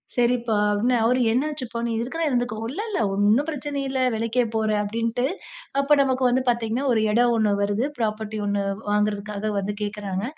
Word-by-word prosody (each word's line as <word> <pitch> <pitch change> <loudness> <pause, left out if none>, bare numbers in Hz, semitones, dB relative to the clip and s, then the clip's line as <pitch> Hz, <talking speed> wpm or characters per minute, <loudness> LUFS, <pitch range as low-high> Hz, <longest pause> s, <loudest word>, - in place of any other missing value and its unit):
சரிப்பா 240 -2 +1 0.2
அப்பிடின்னு 230 +5 +2
அவரு 250 +2 +3
என்ன 255 +5 +2
ஆச்சுப்பா! 250 -5 -5
நீ - - -2
இருக்கணா 325 +8 -3
இருந்துக்கோ. 245 -3 0 0.2
இல்ல, 385 +9 -4
இல்ல 410 - -1
ஒன்னும் 210 +9 +3
பிரச்சனை 290 -1 -3
இல்ல. 265 -1 -1 0.2
வேலைக்கே 230 +2 +1
போற 220 -1 +1
அப்பிடின்ட்டு, 230 +4 -1 0.5
அப்ப 280 +1 -1
நமக்கு 260 -1 +1
வந்து 255 +2 +2
பார்த்தீங்கன்னா, 235 +3 0
ஒரு 220 - +2
இடம் 240 +2 +3
ஒன்னு 215 -2 +2
வருது, 205 +4 0
பிராப்பர்ட்டி 215 -1 -2
ஒன்னு 200 0 0 0.3
வாங்குறதற்காக 210 0 -1
வந்து 205 +1 -3
கேட்கிறாங்க, 205 -2 -3
230 Hz, 170 wpm, -24 LUFS, 210-255 Hz, 0.5 s, அவரு